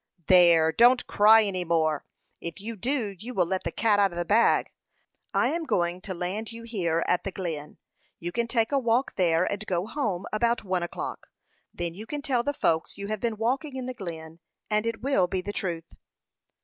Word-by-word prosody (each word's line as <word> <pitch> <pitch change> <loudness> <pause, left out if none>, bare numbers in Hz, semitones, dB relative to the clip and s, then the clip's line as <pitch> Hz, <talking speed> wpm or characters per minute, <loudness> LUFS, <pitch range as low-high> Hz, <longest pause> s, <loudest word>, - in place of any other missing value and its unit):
"There! 170 -3 +6
don't 245 +6 +5
cry 220 +2 +6
any 190 -3 -1
more; 160 -3 0 0.3
if 170 +3 -7
you 225 +3 -6
do, 225 -2 -2
you 245 +5 -7
will 180 - +3
'let 185 +2 -3
the 170 - -1
cat 215 +1 +2
out 200 -2 +3
of 170 - -8
the 175 - -1
bag.' 225 +6 +3 0.6
I - - +2
am 335 +1 -2
going 175 - 0
to 190 -2 -5
land 195 +6 -4
you 230 0 -9
here 175 -8 -1
at 180 - +1
the - - -3
Glen. 165 -6 -5 0.4
You 175 +1 -5
can 235 +4 -1
take 230 0 +1
a 280 - +3
walk 240 +1 +1
there, 170 -2 +3
and 200 +2 -2
go 180 0 0
home 215 -7 -2
about 235 +2 +1
one 185 -2 -1
o'clock. 175 - -5 0.4
Then 170 -1 -4
you 210 +5 -9
can 290 +2 -5
tell 260 -5 +1
the 285 - -1
folks 165 - 0
you 200 0 -6
have 215 -1 -2
been 230 0 -2
walking 265 +6 -1
in 260 -1 -4
the 255 - -4
Glen; 165 -6 -8 0.3
and 210 +1 +1
it 230 -1 -3
will 265 -10 +2
be 185 +1 -2
the 205 +2 -5
truth." 170 -4 -4
200 Hz, 210 wpm, -27 LUFS, 175-230 Hz, 0.6 s, There